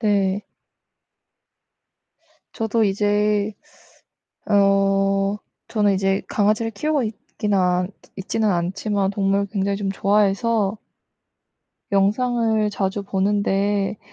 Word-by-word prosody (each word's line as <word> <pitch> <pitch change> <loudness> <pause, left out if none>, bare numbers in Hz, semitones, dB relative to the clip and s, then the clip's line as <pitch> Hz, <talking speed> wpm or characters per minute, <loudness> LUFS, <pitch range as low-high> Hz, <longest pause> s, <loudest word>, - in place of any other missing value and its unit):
네. 200 -2 +1 2.1
저도 225 0 0
이제 205 +1 +1 1.0
어 195 0 +2 0.3
저는 205 -3 +2
이제 195 0 +1
강아지를 215 +2 +1
키우고 295 +5 -1
있기는 210 -1 -3
않 180 0 +1 0.3
있지는 210 +2 -1
않지만 195 +3 -1
동물을 200 0 0
굉장히 200 -1 -1
좀 195 -1 -2
좋아해서 205 +1 +1 1.1
영상을 220 +2 +1
자주 200 0 -2
보는데 200 +1 0
200 Hz, 195 characters per minute, -22 LUFS, 195-210 Hz, 2.1 s, 어